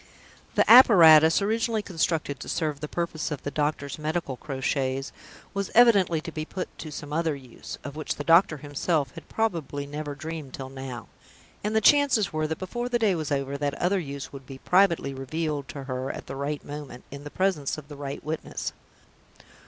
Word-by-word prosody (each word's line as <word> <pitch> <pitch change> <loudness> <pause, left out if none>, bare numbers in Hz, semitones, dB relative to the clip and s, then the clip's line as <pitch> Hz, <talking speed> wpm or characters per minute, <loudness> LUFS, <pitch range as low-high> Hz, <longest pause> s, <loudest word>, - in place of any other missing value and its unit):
The - - +3
apparatus, 165 -8 +8
originally 220 +1 0
constructed 160 -6 -1
to - - -8
serve 150 -3 -1
the 150 - -5
purpose 170 -1 -3
of 150 -4 -5
the 145 - -3
doctor's 145 -1 -2
medical 155 -2 -2
crotchets, 135 0 -2 0.4
was 200 -1 -2
evidently 205 -9 +6
to 165 - -7
be 155 -1 -4
put 185 +3 -6
to 155 - -7
some 150 0 -7
other 160 -1 0
use, 130 -4 -10
of 140 0 -7
which 155 -1 -3
the 145 - -5
doctor 165 0 +5
himself 145 0 -1
had - - -12
probably 165 -10 -2
never 145 0 -5
dreamed 155 -2 -6
till 130 -1 -7
now. 130 -3 -7 0.6
And 210 +1 -1
the 220 - +4
chances 275 - +4
were 155 0 0
that, 160 0 -3
before 240 +6 -4
the 245 - +2
day 220 -4 +2
was 155 -3 -3
over, 140 0 -1
that 145 -1 -1
other 190 +2 +1
use 140 -4 -6
would 135 -2 -10
be 135 - -8
privately 170 -4 +2
revealed 145 +1 -3
to 140 - -7
her 130 0 -4
at - - -6
the 135 - -7
right 140 +2 -3
moment, 145 -4 -8
in 140 +1 -8
the 145 - -7
presence 180 -6 0
of 150 -2 -10
the 145 - -9
right 140 -1 -6
witness. 155 +1 -4
155 Hz, 190 wpm, -26 LUFS, 140-175 Hz, 0.6 s, apparatus